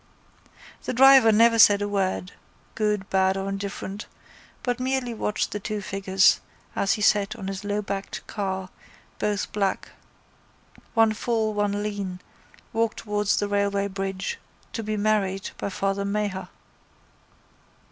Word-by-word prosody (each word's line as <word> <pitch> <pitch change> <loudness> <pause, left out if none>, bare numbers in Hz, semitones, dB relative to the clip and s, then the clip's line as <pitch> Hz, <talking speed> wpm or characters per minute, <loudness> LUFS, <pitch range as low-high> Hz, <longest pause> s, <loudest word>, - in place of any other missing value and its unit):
The - - -3
driver 265 -2 +8
never 230 +1 +5
said 205 -1 +8
a 205 - -1
word, 190 -2 -1 0.4
good, 210 -3 0
bad 190 0 +3
or 195 0 -3
indifferent, 195 +1 -5 0.6
but 245 -1 -1
merely 255 -1 -1
watched 210 -1 -1
the 210 - -3
two 210 +1 -3
figures, 195 -1 +3 0.4
as 195 - +2
he 210 - -2
sat 205 0 +3
on 195 - -7
his 195 0 -4
lowbacked 205 -1 -3
car, 190 -3 -3 0.5
both 205 -1 -1
black, 200 -2 -1 1.1
one 225 -1 +5
full, 220 -1 0
one 205 0 0
lean, 200 -3 -4 0.5
walk 225 -1 +1
towards 210 -1 0
the 205 - 0
railway 200 0 +1
bridge, 195 - -4 0.3
to 225 - -3
be 215 0 -3
married 205 -2 0
by - - -2
Father 195 0 -1
Maher. 200 -1 -2
205 Hz, 135 wpm, -25 LUFS, 195-215 Hz, 1.1 s, driver